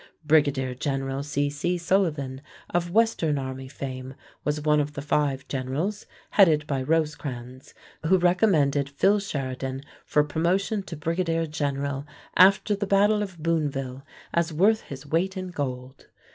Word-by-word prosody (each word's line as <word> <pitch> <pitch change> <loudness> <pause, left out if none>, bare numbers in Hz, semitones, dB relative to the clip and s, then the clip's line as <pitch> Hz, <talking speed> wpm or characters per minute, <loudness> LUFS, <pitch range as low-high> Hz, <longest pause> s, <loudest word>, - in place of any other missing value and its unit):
Brigadier 145 -4 +3
General 135 0 -2
C.C. 145 +4 -1
Sullivan 160 -7 0 0.3
of 175 0 0
western 175 -7 +2
army 130 -1 -5
fame 130 -1 -6 0.3
was 150 0 0
one 150 0 +3
of 145 0 -1
the 145 - -5
five 145 -2 0
generals, 145 +11 -3 0.2
headed 160 -7 +5
by 140 -3 -1
Rosecrans, 135 -4 -2 0.3
who 190 +3 +5
recommended 175 -6 +3
Phil 195 +9 +3
Sheridan 135 -7 -4 0.2
for 150 - +2
promotion 180 +7 0
to 180 -3 -8
brigadier 165 +1 0
general 140 -2 -2 0.3
after 195 +3 +5
the 205 0 -3
battle 205 +2 +4
of 190 -4 -5
Booneville 140 -5 -1 0.3
as 170 -1 +1
"worth 205 +8 +3
his 135 0 -9
weight 175 +6 0
in 185 0 -4
gold." 130 -5 -5
150 Hz, 135 wpm, -26 LUFS, 135-175 Hz, 0.3 s, headed